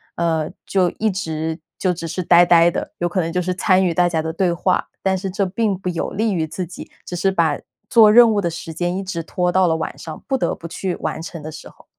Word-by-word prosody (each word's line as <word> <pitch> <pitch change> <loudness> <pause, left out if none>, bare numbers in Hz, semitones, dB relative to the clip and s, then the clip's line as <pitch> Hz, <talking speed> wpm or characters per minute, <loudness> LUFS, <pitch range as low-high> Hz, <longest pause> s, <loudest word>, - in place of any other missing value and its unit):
呃， 160 -2 0 0.2
就 185 -2 +2
一 220 0 +1
直 160 -3 -3 0.2
就 185 -2 +1
只 165 -1 -6
是 185 +3 -3
呆 175 +1 +6
呆 170 0 +6
的， - - -5
有 175 - 0
可 180 +2 0
能 165 0 -3
就 180 - 0
是 185 +1 -1
参 185 0 +3
与 175 - +1
大 175 +1 +3
家 160 -2 -1
的 160 0 -3
对 180 +1 +1
话， 180 +2 0
但 190 -1 +2
是 190 +1 -3
这 195 +1 -1
并 200 +1 -1
不 180 - -7
有 170 -2 -2
利 215 +1 -1
于 160 -3 -1
自 180 +4 -4
己， 175 +2 -10 0.2
只 180 - -6
是 175 +3 +1
把 165 -5 +1 0.3
做 220 -3 +7
任 235 +1 +7
务 210 - +1
的 170 - 0
时 165 0 -7
间 175 +3 -2
一 195 - -3
直 185 -3 -4
拖 180 +2 -1
到 185 0 +3
了 160 - +2
晚 160 0 -4
上， 155 -2 -9
不 265 - +1
得 - - -1
不 - - -13
去 180 +2 -3
完 - - -4
成 165 -1 -8
的 155 - -6
时 155 - -10
候。 - - -21
175 Hz, 285 characters per minute, -20 LUFS, 165-190 Hz, 0.3 s, 做